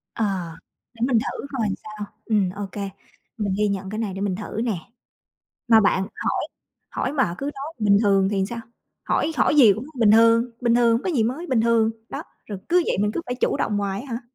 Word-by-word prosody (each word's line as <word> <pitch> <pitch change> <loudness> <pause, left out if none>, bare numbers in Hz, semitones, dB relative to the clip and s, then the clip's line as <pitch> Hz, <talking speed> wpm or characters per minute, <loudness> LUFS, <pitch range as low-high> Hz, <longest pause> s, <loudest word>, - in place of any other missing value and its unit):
Ờ, 225 - 0 0.7
để 230 - -14
mình 245 -4 +3
thử 255 - -4
coi 220 -3 +1 0.2
sao. 215 -1 -7 0.2
Ừm, 210 -5 +2
ô 200 +2 -5
kê, 200 -1 -4 0.5
mình 200 -3 -1
ghi 210 0 +2
nhận 195 -1 -3
cái 215 - -5
này, 205 -4 -2
để 195 - -6
mình 195 -3 0
thử 215 +2 -5
nè. 220 -7 -1 0.9
Mà 225 -1 +7
bạn, 190 -1 +3
hỏi - - -2 0.5
hỏi 265 - -2
mà 265 - +1
cứ 275 - -4
nói 280 +4 -6
"bình 205 -2 +4
thường" 195 -2 +3
thì 195 -2 +1
sao? 235 - -4 0.5
Hỏi 320 - 0
hỏi 300 - +3
gì 235 -8 +8
cũng 220 +6 -5 0.2
"bình 215 -2 +6
thường, 230 +2 +5
bình 235 -1 +2
thường", 235 -1 +4
"không - - -12
có 370 - -1
gì 260 -9 +2
mới", 265 +10 -2
"bình 250 -6 +2
thường", 225 -1 +3 0.2
đó. - - -5 0.2
Rồi 205 -3 -6
cứ 355 +1 +4
vậy, - - +1
mình 210 +1 +1
cứ - - -2
phải 245 - -2
chủ 255 - 0
động 210 - -1
hoài 200 +1 -2
á 235 - -3
hả? 235 - -3
220 Hz, 230 wpm, -23 LUFS, 200-240 Hz, 0.9 s, gì